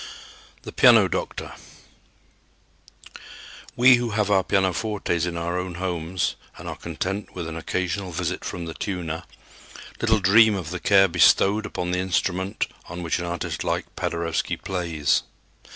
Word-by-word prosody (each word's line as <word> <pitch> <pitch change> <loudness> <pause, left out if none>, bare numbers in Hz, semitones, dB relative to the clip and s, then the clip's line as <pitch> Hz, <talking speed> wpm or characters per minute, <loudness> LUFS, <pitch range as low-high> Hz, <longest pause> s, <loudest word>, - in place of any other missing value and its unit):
The - - -7
"Piano - - +6
Doctor." - - -4 2.2
We 125 +1 +7
who 120 -1 -2
have 105 -1 +1
our 95 -2 +4
pianofortes 95 -2 0
in 85 -1 -4
our 85 +2 -2
own 90 -1 -5
homes 90 -1 -2 0.2
and - - -9
are - - -4
content 95 +5 -5
with 85 -3 -4
an 80 - -6
occasional 95 +3 -3
visit 90 +2 -3
from 85 -2 -5
the 80 - -6
tuner, 85 -4 -4 0.8
little 110 -1 +3
dream 105 +3 +5
of 85 -4 -5
the 90 - -4
care 95 +1 +5
bestowed 95 +4 +4
upon 90 -3 -3
the 90 - 0
instrument 95 +2 -1 0.2
on 90 +1 -6
which 85 +1 -1
an 90 - -3
artist 85 -1 -4
like - - -3
Paderewski 85 -1 -2
plays. 85 -6 0
90 Hz, 145 wpm, -24 LUFS, 85-100 Hz, 2.2 s, We